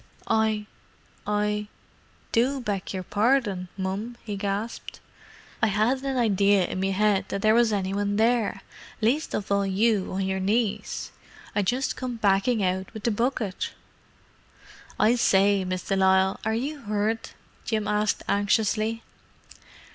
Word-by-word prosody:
"I—I—do 210 Hz, +3 st, -2 dB
beg 205 Hz, -5 st, -3 dB
your 185 Hz, -1 st, -4 dB
pardon, 205 Hz, -2 st, +1 dB
mum!" 200 Hz, +5 st, -3 dB
he 210 Hz, -2 st, -4 dB
gasped. 200 Hz, +3 st, -4 dB, 0.6 s
"I 220 Hz, -, +4 dB
'adn't 225 Hz, +6 st, +1 dB
an 265 Hz, -1 st, -1 dB
idea 200 Hz, -4 st, +3 dB
in 185 Hz, -, -4 dB
me 195 Hz, 0 st, 0 dB
'ead 210 Hz, -2 st, +2 dB
there 215 Hz, +2 st, +2 dB
was 235 Hz, -1 st, +4 dB
any 195 Hz, -2 st, -1 dB
one 205 Hz, 0 st, 0 dB
there, 220 Hz, -2 st, +1 dB, 0.4 s
least 250 Hz, +8 st, +1 dB
of 200 Hz, -, -4 dB
all 200 Hz, 0 st, +3 dB
you 200 Hz, +1 st, +1 dB
on 190 Hz, 0 st, -1 dB
your 190 Hz, 0 st, -1 dB
knees. 210 Hz, +1 st, -1 dB, 0.4 s
I 205 Hz, -, +3 dB
just 250 Hz, +7 st, 0 dB
come 255 Hz, -2 st, -4 dB
backin' 205 Hz, +1 st, +2 dB
out 185 Hz, 0 st, -1 dB
with 215 Hz, -, -7 dB
the 235 Hz, -, +2 dB
bucket!" 225 Hz, -3 st, -1 dB, 1.3 s
"I 220 Hz, +2 st, +5 dB
say, 200 Hz, -4 st, +3 dB
Miss 185 Hz, 0 st, -3 dB
de 195 Hz, -, -1 dB
Lisle, 190 Hz, 0 st, +3 dB
are 220 Hz, +1 st, 0 dB
you 285 Hz, +6 st, -3 dB
hurt?" 215 Hz, -1 st, -2 dB, 0.3 s
Jim 215 Hz, -2 st, -1 dB
asked 210 Hz, 0 st, 0 dB
anxiously. 215 Hz, +2 st, +1 dB
210 Hz, 135 wpm, -26 LUFS, 195-225 Hz, 1.3 s, I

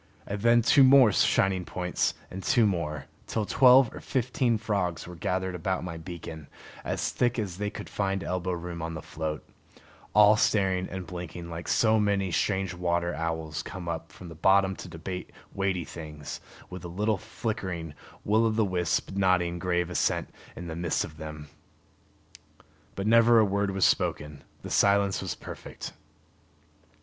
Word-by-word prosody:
And 100 Hz, 0 st, -4 dB
then 120 Hz, +1 st, +5 dB
two 140 Hz, +4 st, +6 dB
more 130 Hz, -4 st, +7 dB
shining 95 Hz, -1 st, +2 dB
points, 90 Hz, 0 st, -1 dB, 0.2 s
and 95 Hz, -, -6 dB
two 115 Hz, +4 st, +3 dB
more, 75 Hz, -7 st, -2 dB, 0.2 s
till 110 Hz, -2 st, -1 dB
twelve 130 Hz, +1 st, +6 dB
or -, -, -8 dB
fifteen 125 Hz, -2 st, 0 dB
frogs 100 Hz, -6 st, -2 dB
were 90 Hz, -, -9 dB
gathered 95 Hz, +2 st, -2 dB
about 90 Hz, +2 st, -2 dB
my 90 Hz, -2 st, -5 dB
beacon, 80 Hz, -3 st, -8 dB, 0.4 s
as -, -, -2 dB
thick 120 Hz, 0 st, +1 dB
as 100 Hz, -6 st, -3 dB
they 105 Hz, 0 st, -1 dB
could -, -, -8 dB
find 95 Hz, -1 st, -2 dB
elbow 90 Hz, 0 st, -2 dB
room 85 Hz, -1 st, -5 dB
on 80 Hz, 0 st, -4 dB
the 80 Hz, -, -7 dB
float, 80 Hz, -1 st, -5 dB, 0.7 s
all 105 Hz, 0 st, +7 dB
staring 95 Hz, -4 st, +1 dB
and 95 Hz, 0 st, -5 dB
blinking 85 Hz, 0 st, -7 dB
like 85 Hz, +1 st, -6 dB
so 110 Hz, -1 st, +3 dB
many 100 Hz, -3 st, +1 dB
strange 95 Hz, +4 st, 0 dB
water 85 Hz, -1 st, -1 dB
owls 80 Hz, -2 st, -3 dB
come 95 Hz, -3 st, -8 dB
up 85 Hz, 0 st, -4 dB
from 90 Hz, -, -11 dB
the 85 Hz, -, -9 dB
bottom 95 Hz, +4 st, +3 dB
to -, -, -8 dB
debate 90 Hz, +3 st, -6 dB, 0.2 s
weighty 95 Hz, -2 st, -1 dB
things, 75 Hz, -2 st, -8 dB, 0.3 s
with 90 Hz, -1 st, -9 dB
a -, -, -5 dB
little 105 Hz, +4 st, -1 dB
flickering 95 Hz, -7 st, -4 dB, 0.3 s
will 110 Hz, +2 st, +3 dB
o' -, -, +2 dB
the 110 Hz, 0 st, +1 dB
wisp 90 Hz, -3 st, -1 dB
nodding 90 Hz, -3 st, +1 dB
grave 90 Hz, 0 st, 0 dB
assent 90 Hz, -, 0 dB, 0.2 s
in 90 Hz, -, -7 dB
the 80 Hz, -1 st, -5 dB
midst 85 Hz, -1 st, 0 dB
of 75 Hz, -, -9 dB
them. 75 Hz, -1 st, -8 dB, 1.5 s
But 100 Hz, -, -3 dB
never 115 Hz, +1 st, +6 dB
a 110 Hz, -, +6 dB
word 100 Hz, 0 st, 0 dB
was 95 Hz, -1 st, +2 dB
spoken; 75 Hz, -2 st, 0 dB, 0.2 s
the -, -, -7 dB
silence 100 Hz, -1 st, +3 dB
was -, -, -3 dB
perfect. -, -, -9 dB
95 Hz, 165 wpm, -28 LUFS, 85-105 Hz, 1.5 s, more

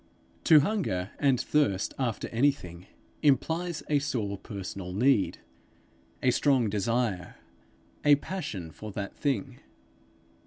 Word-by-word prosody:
To 155 Hz, -2 st, +8 dB
hunger 140 Hz, -, -1 dB
and 135 Hz, -4 st, +3 dB
thirst 130 Hz, -9 st, +1 dB
after 120 Hz, -5 st, -1 dB
anything, 115 Hz, -9 st, 0 dB, 0.3 s
implies 160 Hz, +4 st, +1 dB
a 150 Hz, -1 st, +3 dB
sore 115 Hz, -8 st, -2 dB
personal 95 Hz, -2 st, -7 dB
need, 115 Hz, 0 st, +2 dB, 0.9 s
a 125 Hz, -, +5 dB
strong 130 Hz, -6 st, +2 dB
desire, 105 Hz, -3 st, -1 dB, 0.7 s
a 145 Hz, -1 st, +7 dB
passion 140 Hz, -, -5 dB
for 105 Hz, +6 st, -8 dB
that 100 Hz, 0 st, -5 dB
thing. 135 Hz, -9 st, -2 dB
120 Hz, 110 wpm, -28 LUFS, 100-145 Hz, 0.9 s, To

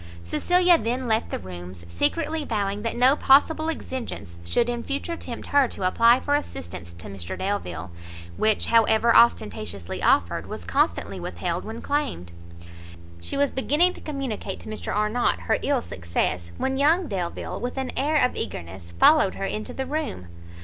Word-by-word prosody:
Cecilia 355 Hz, -, +3 dB
then 245 Hz, +2 st, -2 dB
left 220 Hz, 0 st, +1 dB
the -, -, -2 dB
rooms 90 Hz, -1 st, -9 dB
secretly 310 Hz, -, 0 dB
vowing 205 Hz, -5 st, -2 dB
that 230 Hz, +1 st, -2 dB
no 255 Hz, +3 st, +5 dB
possible 315 Hz, +4 st, +4 dB
exigence 230 Hz, -, -5 dB
should 235 Hz, -, +1 dB
in 240 Hz, -1 st, -2 dB
future 285 Hz, +6 st, -3 dB
tempt 240 Hz, -7 st, -7 dB
her 280 Hz, -2 st, +4 dB
to 190 Hz, -, -4 dB
apply 230 Hz, +6 st, +5 dB
for 285 Hz, -, -1 dB
assistance 90 Hz, -, -4 dB
to 85 Hz, 0 st, -11 dB
Mr 95 Hz, -2 st, -6 dB
Delvile, 90 Hz, -, -3 dB, 0.4 s
which, 215 Hz, -, +2 dB
however 230 Hz, 0 st, +4 dB
ostentatiously 105 Hz, -, +2 dB
offered, -, -, +2 dB
was -, -, -7 dB
constantly 90 Hz, +2 st, 0 dB
withheld 90 Hz, -, -3 dB
when 225 Hz, +2 st, -7 dB
claimed. 280 Hz, -, -2 dB, 0.9 s
She 85 Hz, -, -4 dB
was 285 Hz, 0 st, +2 dB
beginning 300 Hz, +7 st, +2 dB
to -, -, -13 dB
communicate 275 Hz, -7 st, -4 dB
to -, -, -9 dB
Mr 215 Hz, -, -5 dB
Arnott 210 Hz, +3 st, +1 dB
her -, -, 0 dB
ill 280 Hz, -4 st, +1 dB
success, 85 Hz, 0 st, -2 dB
when 265 Hz, 0 st, -1 dB
young 320 Hz, +5 st, +3 dB
Delvile, 180 Hz, -4 st, -4 dB
with 250 Hz, +2 st, -4 dB
an 265 Hz, -1 st, -2 dB
air 295 Hz, +4 st, 0 dB
of 250 Hz, -, -2 dB
eagerness, 85 Hz, 0 st, -5 dB
followed 305 Hz, -11 st, +6 dB
her 195 Hz, -, -3 dB
into 215 Hz, +2 st, -4 dB
the 265 Hz, -, -4 dB
room. 280 Hz, -, -4 dB
225 Hz, 165 wpm, -25 LUFS, -, 0.9 s, followed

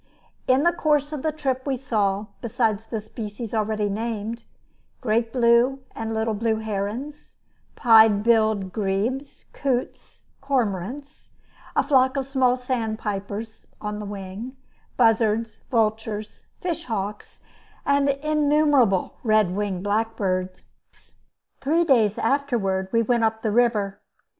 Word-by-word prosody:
In 260 Hz, +2 st, +4 dB
the 345 Hz, +1 st, +4 dB
course 300 Hz, -3 st, +1 dB
of 295 Hz, -, -4 dB
the 315 Hz, -, 0 dB
trip 270 Hz, -3 st, -2 dB
we 270 Hz, -2 st, 0 dB
saw, 210 Hz, -6 st, 0 dB, 0.2 s
besides 225 Hz, -2 st, -1 dB
the 220 Hz, -1 st, -3 dB
species 215 Hz, +1 st, -7 dB
already 215 Hz, -1 st, 0 dB
named, 225 Hz, +2 st, -4 dB, 0.5 s
great 230 Hz, -1 st, 0 dB
blue 245 Hz, +2 st, +3 dB
and 225 Hz, 0 st, -4 dB
little 220 Hz, 0 st, 0 dB
blue 220 Hz, +1 st, 0 dB
herons, 220 Hz, +7 st, -5 dB, 0.4 s
pied 220 Hz, -4 st, +6 dB
billed 215 Hz, -4 st, +2 dB
grebes, 220 Hz, +7 st, -2 dB
coots, 255 Hz, -3 st, -3 dB, 0.2 s
cormorants, 270 Hz, -, -3 dB, 0.4 s
a -, -, +3 dB
flock 260 Hz, -1 st, +3 dB
of 270 Hz, -, -1 dB
small 260 Hz, -2 st, +2 dB
sandpipers 220 Hz, -3 st, -4 dB
(on 210 Hz, 0 st, -4 dB
the 210 Hz, -, -5 dB
wing), 205 Hz, +6 st, -7 dB, 0.4 s
buzzards, 225 Hz, -1 st, +2 dB
vultures, 220 Hz, -2 st, -1 dB
fish 350 Hz, -5 st, -3 dB
hawks, 210 Hz, -3 st, -5 dB, 0.4 s
and 280 Hz, 0 st, +3 dB
innumerable 290 Hz, -6 st, +2 dB
red 215 Hz, -5 st, +2 dB
winged 195 Hz, -3 st, -2 dB
blackbirds. 205 Hz, -3 st, -2 dB, 0.9 s
Three 320 Hz, +5 st, +2 dB
days 230 Hz, -10 st, +3 dB
afterward 225 Hz, -8 st, 0 dB
we 230 Hz, 0 st, +3 dB
went 235 Hz, 0 st, +1 dB
up 220 Hz, 0 st, 0 dB
the 220 Hz, -, +1 dB
river. 210 Hz, -4 st, +1 dB
225 Hz, 120 wpm, -24 LUFS, 210-260 Hz, 0.9 s, pied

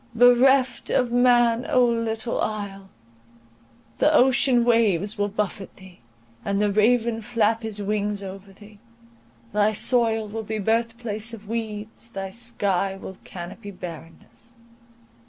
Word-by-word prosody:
Bereft 250 Hz, +2 st, +4 dB
of 245 Hz, -1 st, +1 dB
man, 240 Hz, -1 st, +4 dB
O 250 Hz, -1 st, +4 dB
little 230 Hz, -1 st, -1 dB
isle! 200 Hz, -2 st, -4 dB, 1.1 s
the 305 Hz, -, +4 dB
ocean 260 Hz, -3 st, +4 dB
waves 215 Hz, -4 st, +2 dB
will 205 Hz, -1 st, 0 dB
buffet 200 Hz, -1 st, -4 dB
thee, 190 Hz, -2 st, -15 dB, 0.4 s
and 200 Hz, 0 st, -1 dB
the 210 Hz, -1 st, +2 dB
raven 225 Hz, +2 st, +2 dB
flap 225 Hz, 0 st, +1 dB
his 215 Hz, -2 st, -5 dB
wings 205 Hz, 0 st, -1 dB
over 195 Hz, +1 st, -9 dB
thee; 205 Hz, +1 st, -16 dB, 0.7 s
thy 210 Hz, +1 st, +3 dB
soil 225 Hz, -1 st, +1 dB
will 220 Hz, +2 st, -5 dB
be 220 Hz, 0 st, -4 dB
birth 225 Hz, +2 st, 0 dB
place 225 Hz, -1 st, -5 dB
of 210 Hz, -2 st, -15 dB
weeds, 220 Hz, 0 st, -5 dB
thy 195 Hz, -3 st, -6 dB
sky 195 Hz, -4 st, -1 dB
will 190 Hz, -1 st, -9 dB
canopy 185 Hz, +4 st, -9 dB
barrenness. 180 Hz, +5 st, -9 dB
220 Hz, 130 wpm, -24 LUFS, 200-235 Hz, 1.1 s, Bereft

